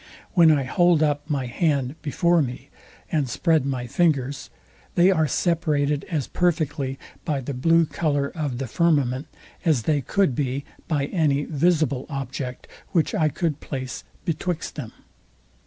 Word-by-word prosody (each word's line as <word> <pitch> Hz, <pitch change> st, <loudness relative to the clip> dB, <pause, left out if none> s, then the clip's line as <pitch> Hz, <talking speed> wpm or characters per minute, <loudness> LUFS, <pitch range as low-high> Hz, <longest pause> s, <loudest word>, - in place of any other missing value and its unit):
When 165 Hz, -3 st, +7 dB
I 145 Hz, -3 st, +3 dB
hold 170 Hz, +4 st, +3 dB
up 145 Hz, 0 st, 0 dB
my 140 Hz, -4 st, 0 dB
hand 135 Hz, 0 st, 0 dB
before 170 Hz, +4 st, +2 dB
me, 125 Hz, 0 st, -5 dB, 0.4 s
and 145 Hz, -5 st, +1 dB
spread 155 Hz, +2 st, +2 dB
my 130 Hz, -3 st, -2 dB
fingers, 140 Hz, -1 st, 0 dB, 0.5 s
they 180 Hz, +2 st, +6 dB
are 160 Hz, -4 st, +2 dB
separated 150 Hz, -2 st, +1 dB
as 155 Hz, -8 st, -2 dB
perfectly 150 Hz, -6 st, 0 dB, 0.3 s
by 145 Hz, -3 st, -1 dB
the 135 Hz, +2 st, -5 dB
blue 165 Hz, +6 st, +4 dB
colour 145 Hz, -3 st, 0 dB
of 145 Hz, -7 st, -3 dB
the 135 Hz, -, -3 dB
firmament, 140 Hz, -1 st, +1 dB, 0.4 s
as 155 Hz, -, +2 dB
they 150 Hz, +1 st, +1 dB
could 190 Hz, -, +1 dB
be 135 Hz, +1 st, -2 dB, 0.2 s
by 145 Hz, -4 st, 0 dB
any 145 Hz, -3 st, +1 dB
visible 155 Hz, -4 st, +1 dB
object, 135 Hz, -2 st, -5 dB, 0.3 s
which 165 Hz, -3 st, +2 dB
I 155 Hz, -1 st, +2 dB
could 155 Hz, -2 st, -2 dB
place 130 Hz, -3 st, -5 dB, 0.2 s
betwixt 170 Hz, +1 st, -2 dB
them. 135 Hz, -8 st, -6 dB
145 Hz, 145 wpm, -24 LUFS, 135-165 Hz, 0.5 s, When